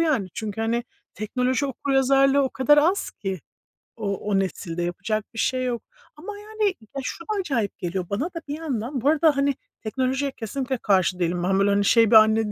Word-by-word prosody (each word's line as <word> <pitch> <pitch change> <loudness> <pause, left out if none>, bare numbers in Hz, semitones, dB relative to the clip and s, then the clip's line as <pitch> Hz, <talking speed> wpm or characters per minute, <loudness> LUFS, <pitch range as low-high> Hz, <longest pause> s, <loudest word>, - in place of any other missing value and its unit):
yani. 285 - +1
Çünkü, 220 -1 -4
hani, 230 +2 0 0.3
teknoloji 250 +6 -1
okuryazarlığı 275 +1 +3
o 265 - +1
kadar 295 +3 +4
az 350 +7 +2
ki 190 -4 -5 0.6
o 200 -3 -2
o 205 -2 0
nesilde 175 -2 -3
yapacak 215 +5 -2
bir 225 - -6
şey 255 -1 +1
yok 240 -3 -2 0.3
ama 370 +8 -8
yani 425 -1 -1 0.2
ya, 275 - -2
şu 335 - -5
da - - -23
acayip 255 - -2
geliyor 180 +1 -3
bana 205 +9 -1
da 345 -1 -6
bir 290 +1 -4
yandan 260 -4 -3
bu 280 - +3
arada, 310 -2 +3
hani, 280 0 +2 0.3
teknolojiye 260 +4 -1
kesinlikle 260 +3 -3
karşı 190 -4 +2
değilim. 175 0 0
Ben 190 +2 +2
böyle, 200 - +3
hani 200 0 +2
şey, 225 0 +5
bir - - +6
anne 220 0 +6
240 Hz, 190 wpm, -24 LUFS, 205-280 Hz, 0.6 s, bir